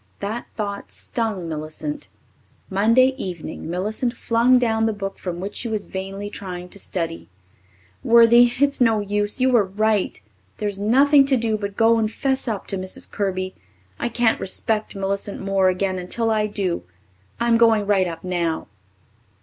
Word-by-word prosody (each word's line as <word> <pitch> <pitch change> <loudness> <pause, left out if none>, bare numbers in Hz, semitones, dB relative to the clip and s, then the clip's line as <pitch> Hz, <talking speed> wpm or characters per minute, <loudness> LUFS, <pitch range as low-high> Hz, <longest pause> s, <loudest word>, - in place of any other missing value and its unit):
That 215 +4 -4
thought 200 -2 -4
stung 220 -7 -3
Millicent. 160 - -5 0.6
Monday 230 +7 +4
evening 170 - -6
Millicent 220 +7 -2
flung 235 +2 +3
down 225 -2 +2
the 220 - 0
book 195 -1 -5
from 175 -2 -4
which 195 +3 -5
she 240 - -3
was 215 -2 -3
vainly 195 +2 -5
trying 180 -3 -6
to 200 - -10
study. 165 - -4 0.7
"Worthie, 235 +1 +6
it's 280 -2 +2
no 225 -3 +4
use. 205 +2 -1
You 260 0 +3
were 235 -4 +5
right. 210 - 0 0.4
There's 205 -2 -3
nothing 275 +7 +5
to 270 -2 +3
do 225 -2 0
but 200 -1 -5
go 230 0 +4
and 215 -1 0
'fess 265 +2 -1
up 215 -4 -2
to 195 - 0
Mrs. 185 0 -4
Kirby. 185 -2 -2 0.5
I - - -1
can't 235 -1 +2
respect 215 +3 -2
Millicent 200 +1 -3
Moore 195 -1 +2
again 185 0 -1
until 225 +6 -1
I 215 -1 +1
do. 195 -4 -2 0.6
I'm 235 0 +3
going 225 -3 +4
right 195 -2 +2
up 165 -1 -7
now." 170 - -2
205 Hz, 160 wpm, -22 LUFS, 190-230 Hz, 0.7 s, Worthie